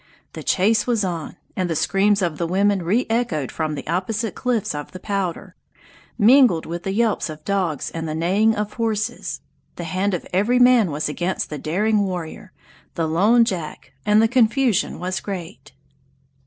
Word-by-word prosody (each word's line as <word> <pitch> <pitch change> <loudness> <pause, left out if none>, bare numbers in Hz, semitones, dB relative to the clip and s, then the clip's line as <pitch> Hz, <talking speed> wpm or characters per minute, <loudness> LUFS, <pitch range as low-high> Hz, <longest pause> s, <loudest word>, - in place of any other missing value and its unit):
The - - -7
chase 210 +3 +2
was 230 -4 +1
on, 170 -3 -4 0.2
and 185 -2 -1
the 165 - -1
screams 200 +4 +2
of 165 -4 -2
the 170 - -1
women 195 +2 +2
reechoed 205 - 0
from 155 -2 -2
the 140 - -7
opposite 200 +6 -2
cliffs 245 -4 -1
of 145 -1 -7
the 185 - -8
Powder, 190 -2 -3 0.6
mingled 235 - +5
with 170 +1 -5
the 195 - -3
yelps 215 -3 0
of 155 0 -9
dogs 185 -7 -1
and 165 -1 -4
the 155 - -3
neighing 200 +7 +2
of 210 0 -3
horses. 220 -3 -2 0.3
The 175 - -6
hand 185 +4 -1
of 175 - -6
every 210 +7 +2
man 245 -5 +5
was 150 +1 -2
against 175 +5 -2
the 150 - -4
daring 210 +9 +1
warrior, 185 0 -5 0.4
the 165 - 0
lone 210 +9 +4
Jack, 165 - -5
and 210 +1 +4
the - - +5
confusion 245 -2 +2
was 185 +1 -3
great. 190 -2 -7
190 Hz, 170 wpm, -22 LUFS, 170-220 Hz, 0.6 s, mingled